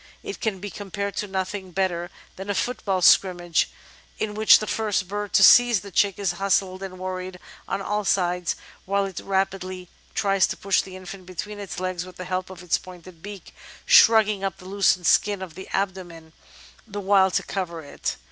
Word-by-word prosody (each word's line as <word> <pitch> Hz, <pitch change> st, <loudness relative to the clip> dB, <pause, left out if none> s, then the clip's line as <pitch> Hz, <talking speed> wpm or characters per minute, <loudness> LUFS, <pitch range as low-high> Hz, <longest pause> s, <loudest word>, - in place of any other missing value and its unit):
It 405 Hz, -1 st, -7 dB
can 215 Hz, -4 st, -1 dB
be 205 Hz, +1 st, -6 dB
compared 200 Hz, 0 st, -5 dB
to 210 Hz, -, -2 dB
nothing 190 Hz, 0 st, -4 dB
better 175 Hz, -1 st, -1 dB, 0.3 s
than 190 Hz, +2 st, -8 dB
a 205 Hz, -, 0 dB
football 195 Hz, -7 st, -1 dB
'scrimmage' 175 Hz, -3 st, +4 dB, 0.5 s
in 210 Hz, -1 st, -3 dB
which 215 Hz, +1 st, +7 dB
the 215 Hz, -, -4 dB
first 210 Hz, -5 st, -1 dB
bird 205 Hz, +1 st, -4 dB
to -, -, +5 dB
seize 240 Hz, -4 st, +7 dB
the 200 Hz, 0 st, -11 dB
chick 200 Hz, +2 st, +2 dB
is 195 Hz, -4 st, 0 dB
hustled 190 Hz, -1 st, +1 dB
and 190 Hz, -1 st, -7 dB
worried 185 Hz, 0 st, -5 dB, 0.3 s
on 195 Hz, -, -3 dB
all 210 Hz, +1 st, -1 dB
sides 180 Hz, -2 st, 0 dB, 0.3 s
while 200 Hz, +1 st, +1 dB
it 190 Hz, -2 st, -6 dB
rapidly 185 Hz, -2 st, -2 dB, 0.3 s
tries 195 Hz, -2 st, +2 dB
to -, -, -5 dB
push 195 Hz, -1 st, +2 dB
the 190 Hz, -1 st, -11 dB
infant 185 Hz, 0 st, -10 dB
between 205 Hz, +3 st, -6 dB
its 200 Hz, -3 st, -6 dB
legs 185 Hz, -1 st, -3 dB
with 185 Hz, -1 st, -12 dB
the 185 Hz, -, -6 dB
help 185 Hz, 0 st, -3 dB
of 185 Hz, -1 st, -10 dB
its 175 Hz, -, +1 dB
pointed 180 Hz, -2 st, -13 dB
beak, 205 Hz, 0 st, -10 dB, 0.3 s
shrugging 220 Hz, -, +6 dB
up 195 Hz, 0 st, -2 dB
the 185 Hz, -, -15 dB
loose 195 Hz, 0 st, +2 dB
skin 205 Hz, +4 st, +3 dB
of 185 Hz, -4 st, -8 dB
the 190 Hz, +3 st, -9 dB
abdomen 180 Hz, -5 st, -4 dB, 0.5 s
the 205 Hz, -1 st, -6 dB
while 195 Hz, -1 st, +4 dB
to -, -, 0 dB
cover 170 Hz, -4 st, -4 dB
it. 145 Hz, -, -4 dB
190 Hz, 190 wpm, -24 LUFS, 185-200 Hz, 0.5 s, which